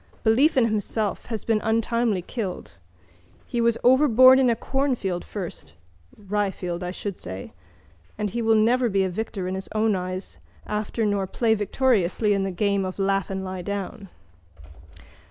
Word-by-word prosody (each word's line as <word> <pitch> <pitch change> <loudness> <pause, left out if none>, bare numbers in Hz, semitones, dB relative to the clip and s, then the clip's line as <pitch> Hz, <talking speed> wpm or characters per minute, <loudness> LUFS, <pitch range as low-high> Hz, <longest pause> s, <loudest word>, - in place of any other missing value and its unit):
Belief 265 +7 +4
in 250 - +5
himself 215 -1 -2
has 225 -2 -4
been 220 -2 +1
untimely 225 -3 0
killed. 180 - -6 0.7
He 240 - -2
was 230 0 +2
overborne 260 0 +7
in 260 -2 +4
a 235 - +2
cornfield 245 -9 -1
first 190 -5 -7 0.4
(ryefield, 195 -3 -2
I 180 - -3
should 190 +1 -5
say) 95 +1 -7 0.7
and 210 -2 -2
he 235 - -2
will 225 -1 +3
never 240 +3 +3
be 195 -1 +2
a 190 - 0
victor 195 0 -4
in 185 - -3
his 190 0 -6
own 215 -1 +2
eyes 185 +1 -5 0.3
after 210 +2 -2
nor 200 -2 0
play 225 +3 +1
victoriously 210 -2 +1
the 195 0 -1
game 200 +1 0
of 185 0 -5
laugh 195 -1 0
and 190 0 -4
lie 185 -1 -5
down. 200 +2 -5
210 Hz, 155 wpm, -24 LUFS, 190-230 Hz, 0.7 s, overborne